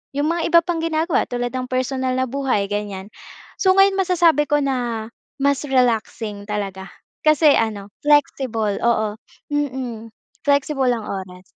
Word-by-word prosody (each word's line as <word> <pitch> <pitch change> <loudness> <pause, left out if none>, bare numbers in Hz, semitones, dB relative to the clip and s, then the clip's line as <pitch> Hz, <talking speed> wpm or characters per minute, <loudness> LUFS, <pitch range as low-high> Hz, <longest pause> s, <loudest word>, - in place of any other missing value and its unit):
'yong 290 +1 +1
mga 340 0 -1
iba 340 0 +6
pang 345 -1 -2
ginagawa 320 -1 0
tulad 245 0 -3
ng 255 -1 -4
personal 255 0 -1
na 260 - +1
buhay 255 -6 -1
ganiyan. 205 -1 -4 0.5
So 375 -1 +4
ngayon 390 0 +4
masasabi 340 -5 +3
ko 295 -1 +2
na, 240 -4 -2 0.3
mas 280 -1 +3
relaxing 225 -5 0
talaga. 195 -2 -4 0.3
Kasi 305 -1 +5
ano 205 -3 -3
flexible 260 -8 +1
oo. 220 -3 +1 0.4
Mm. 260 -6 -3 0.4
Flexible 280 -1 +2
ang 225 - -6
oras. 185 -2 -7
255 Hz, 140 wpm, -21 LUFS, 220-295 Hz, 0.5 s, iba